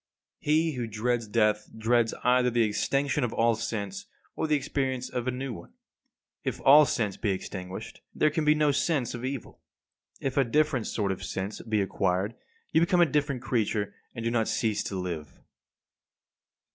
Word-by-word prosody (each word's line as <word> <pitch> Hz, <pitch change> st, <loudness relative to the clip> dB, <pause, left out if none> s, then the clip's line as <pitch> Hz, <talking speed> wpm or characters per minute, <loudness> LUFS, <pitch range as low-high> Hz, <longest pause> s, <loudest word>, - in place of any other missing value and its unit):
58. 150 Hz, -, -2 dB
He 160 Hz, +1 st, +3 dB
who 120 Hz, -2 st, -2 dB
dreads 115 Hz, +1 st, -1 dB
death 105 Hz, -1 st, +1 dB
dreads 115 Hz, +1 st, +2 dB
either 125 Hz, 0 st, +4 dB
the 120 Hz, -1 st, +2 dB
extinction 135 Hz, +6 st, 0 dB
of 120 Hz, -, -1 dB
all 115 Hz, 0 st, +3 dB
sense 100 Hz, -3 st, -4 dB, 0.3 s
or -, -, -1 dB
the 155 Hz, -, +3 dB
experience 135 Hz, -3 st, -2 dB
of 125 Hz, 0 st, -3 dB
a -, -, +3 dB
new 130 Hz, 0 st, -4 dB
one. 85 Hz, -, -11 dB, 0.7 s
If -, -, -3 dB
all 145 Hz, +2 st, +8 dB
sense 105 Hz, -5 st, -1 dB
be 110 Hz, -, -1 dB
extinguished, 95 Hz, -1 st, -5 dB
there 155 Hz, -, +3 dB
can 155 Hz, +1 st, 0 dB
be 150 Hz, 0 st, +5 dB
no 150 Hz, -1 st, +3 dB
sense 140 Hz, -3 st, 0 dB
of 120 Hz, 0 st, -6 dB
evil. 130 Hz, -1 st, -5 dB, 0.6 s
If 135 Hz, 0 st, -3 dB
a 140 Hz, -, +6 dB
different 145 Hz, -1 st, +1 dB
sort 100 Hz, -3 st, -1 dB
of 95 Hz, 0 st, -5 dB
sense 95 Hz, +2 st, -4 dB
be 110 Hz, -2 st, 0 dB
acquired 95 Hz, +2 st, 0 dB, 0.4 s
you 160 Hz, -, +4 dB
become 175 Hz, +1 st, +3 dB
a -, -, +8 dB
different 145 Hz, -4 st, -1 dB
creature, 105 Hz, -4 st, 0 dB, 0.2 s
and 115 Hz, -1 st, -5 dB
do 115 Hz, -, +1 dB
not 115 Hz, -2 st, +1 dB
cease 110 Hz, -3 st, 0 dB
to 100 Hz, -, -4 dB
live. 85 Hz, -5 st, -5 dB
120 Hz, 180 wpm, -28 LUFS, 105-140 Hz, 0.7 s, all